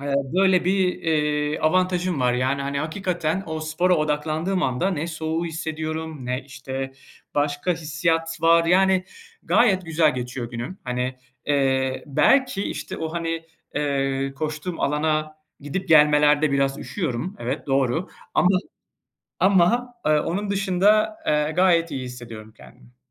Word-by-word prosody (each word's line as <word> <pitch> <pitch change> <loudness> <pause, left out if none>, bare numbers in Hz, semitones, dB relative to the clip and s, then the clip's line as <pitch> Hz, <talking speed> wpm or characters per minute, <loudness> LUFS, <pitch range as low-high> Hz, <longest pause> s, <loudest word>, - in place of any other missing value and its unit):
eee, 140 0 -2 0.2
böyle 190 -1 +4
bir, 190 +1 +2 0.2
eee, 150 -1 0
avantajım 180 -1 +1
var, 125 -1 +3
yani, 130 +3 0
hani, 140 0 -2
hakikaten 175 +1 -2
o 160 -1 -4
spora 160 +4 +1
odaklandığım 155 +4 -1
anda 130 +10 0
ne 165 -2 -2
soğuğu 160 0 -3
hissediyorum 160 -3 -4
ne, 125 +1 -2
işte, 135 -1 -6 0.4
başka 145 +4 0
hissiyat 165 +1 -1
var. 165 0 +5
Yani, 185 +2 +3 0.4
gayet 195 -6 +3
güzel 160 -2 +2
geçiyor 125 -1 -5
günüm. 120 +11 -6
Hani, 125 +1 -3 0.3
eee, 130 -2 +1
belki, 255 - +3
işte, - - -5
o, 160 0 -4
hani, 165 -1 -3 0.3
eee, 135 -2 -1
koştuğum 155 +4 -4
alana 155 +1 0 0.2
gidip 165 +7 -4
gelmelerde 150 -1 +5
biraz 140 0 +1
üşüyorum, 170 - -4
evet, 125 +5 -4
doğru 135 +5 +1 0.3
ama, 180 - +4 0.9
ama, 200 +7 +3
ııı, 150 -1 +3
onun 200 +5 -2
dışında, 200 +2 +2
eee, 150 0 +2
gayet 170 -1 +3
iyi 135 -2 -4
hissediyorum 115 -3 -9
kendimi. 125 0 -18
155 Hz, 130 wpm, -23 LUFS, 140-180 Hz, 0.9 s, var